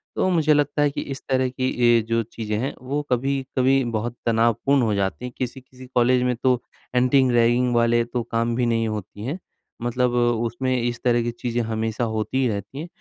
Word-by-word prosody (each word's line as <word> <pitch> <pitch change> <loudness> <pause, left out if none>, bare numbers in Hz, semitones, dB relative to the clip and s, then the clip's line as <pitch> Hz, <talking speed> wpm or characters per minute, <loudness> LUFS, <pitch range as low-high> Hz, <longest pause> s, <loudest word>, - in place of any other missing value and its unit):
तो - - +1
मुझे 160 -4 +3
लगता 145 0 +1
है 145 - +4
कि - - -4
इस 135 - -5
तरह 130 -1 +2
की 130 0 -2
ये 120 -1 +5
जो 115 0 +1
चीज़ें 110 -1 -4
हैं, 135 - -2
वो 140 +3 -2
कभी-कभी 135 +1 +1
बहुत 115 +2 -2
तनावपूर्ण 115 +4 +2
हो 110 - +1
जाती 100 +5 -2
हैं। 125 - -5
किसी-किसी 130 0 -7
कॉलेज 125 +1 +4
में 125 -1 +1
तो 125 0 +1 0.3
एंटी-रैगिंग 125 -1 +3
वाले 120 0 +3
तो 120 0 -3
काम 115 +1 0
भी 125 0 +1
नहीं 115 -1 +1
होती 105 -1 -6
हैं, 145 +8 -3 0.4
मतलब 120 +1 0
उसमें 120 +1 0
इस 120 0 -2
तरह 120 -1 +3
की 120 - -2
चीज़ें 120 0 -2
हमेशा 110 +1 -2
होती 110 +2 -2
ही 130 - +2
रहती 105 +5 -4
हैं। 165 - -5
120 Hz, 195 wpm, -23 LUFS, 115-130 Hz, 0.4 s, ये